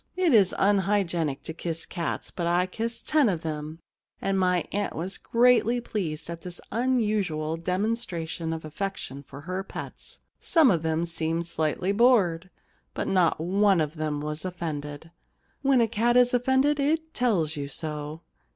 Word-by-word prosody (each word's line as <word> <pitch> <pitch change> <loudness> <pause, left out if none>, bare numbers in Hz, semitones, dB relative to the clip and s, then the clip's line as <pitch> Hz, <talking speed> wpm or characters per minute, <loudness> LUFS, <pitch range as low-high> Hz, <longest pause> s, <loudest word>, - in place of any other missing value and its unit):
It 360 -6 +3
is 200 -5 +5
unhygienic 190 -7 +1
to 160 - -6
kiss 165 0 -4
cats, 170 -2 -4
but 170 -2 -3
I 175 +1 +3
kissed 225 +5 -5
ten 300 -6 +4
of 175 -3 -2
them, 155 0 -4 0.4
and 195 0 0
my 180 -2 +2
aunt 205 0 -2
was 180 +4 -3
greatly 245 0 +3
pleased 165 -9 -4
at 170 0 -6
this 180 -2 -8
unusual 210 -10 0
demonstration 180 -3 -2
of 160 -1 -4
affection 155 -4 -5
for 140 0 -11
her 185 +4 -4
pets. - - -8 0.2
Some 315 -8 +4
of 170 -4 +1
them 160 +1 0
seemed 165 0 -2
slightly 165 +3 -1
bored, 200 -7 +3 0.5
but - - -2
not 180 -5 +2
one 180 -2 +2 0.3
was 150 +1 -4
offended. 160 -4 -5 0.5
When 270 -3 +4
a 230 - +3
cat 235 +2 +2
is 245 0 +5
offended 265 +4 +2
it 320 +3 0
tells 185 - +1
you 140 -1 -4
so. 150 +2 -4
180 Hz, 150 wpm, -26 LUFS, 160-225 Hz, 0.5 s, is